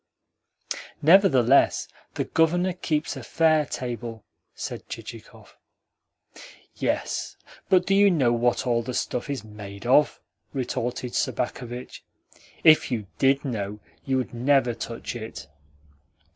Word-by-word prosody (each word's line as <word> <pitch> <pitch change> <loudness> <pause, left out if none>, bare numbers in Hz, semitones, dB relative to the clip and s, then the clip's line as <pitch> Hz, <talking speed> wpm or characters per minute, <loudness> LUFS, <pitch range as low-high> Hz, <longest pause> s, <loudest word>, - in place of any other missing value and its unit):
"Nevertheless 145 - +5 0.3
the - - 0
Governor 175 +3 +2
keeps 155 -3 -2
a - - -7
fair 155 -3 +2
table," 120 -3 -5 0.3
said - - -6
Chichikov. - - -10 1.2
"Yes, - - -2 0.3
but 185 -1 +4
do 195 - +1
you 200 +1 +6
know 135 -10 +3
what 120 +2 +1
all 120 -2 +2
the 120 +2 -5
stuff 125 +3 -2
is 135 -6 -3
MADE 105 -1 -10
OF?" 135 +4 +4 0.3
retorted 125 -2 -3
Sobakevitch. 125 0 -3 0.6
"If 155 -1 +6
you 115 -5 -2
DID 135 +1 +3
know 105 -5 -3 0.2
you 135 -1 0
would 130 - -3
never 125 0 +2
touch 115 +2 -6
it." 110 -9 -7
125 Hz, 115 wpm, -25 LUFS, 120-150 Hz, 1.2 s, you